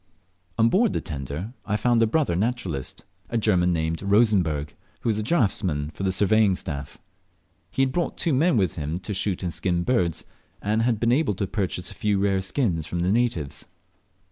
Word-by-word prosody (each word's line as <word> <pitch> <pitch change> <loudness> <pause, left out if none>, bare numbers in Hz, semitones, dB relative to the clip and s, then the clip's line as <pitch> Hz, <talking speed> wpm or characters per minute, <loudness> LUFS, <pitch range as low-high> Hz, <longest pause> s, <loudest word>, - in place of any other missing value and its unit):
On 115 0 +5
board 205 - +3
the - - 0
tender 75 - -5
I 105 - -1
found 120 +1 +2
a 115 - +4
brother 140 - +1
naturalist, 95 - -3 0.2
a 120 - -1
German 90 -5 +2
named 80 -1 -1
Rosenberg, 100 -8 +2 0.3
who - - -1
was 110 -1 0
draughtsman 95 - 0
to - - -9
the 95 -1 +1
surveying 105 +1 +3
staff. 70 -6 -6 0.7
He 135 - +1
had 130 - +1
brought 175 +4 -2
two 165 - 0
men 145 +1 +3
with 95 -4 0
him 75 +2 -2
to 95 +3 -5
shoot 95 -1 -1
and 85 -2 -2
skin 85 +1 0
birds, 85 -8 0 0.3
and 110 +2 0
had 115 -2 +1
been 115 +1 +2
able 125 -6 +2
to 100 - -1
purchase 95 -2 -3
a - - -9
few 105 0 0
rare 95 -1 +1
skins 95 - -1
from 85 - -3
the 90 +2 +1
natives. 110 - -1
100 Hz, 190 wpm, -25 LUFS, 85-115 Hz, 0.7 s, On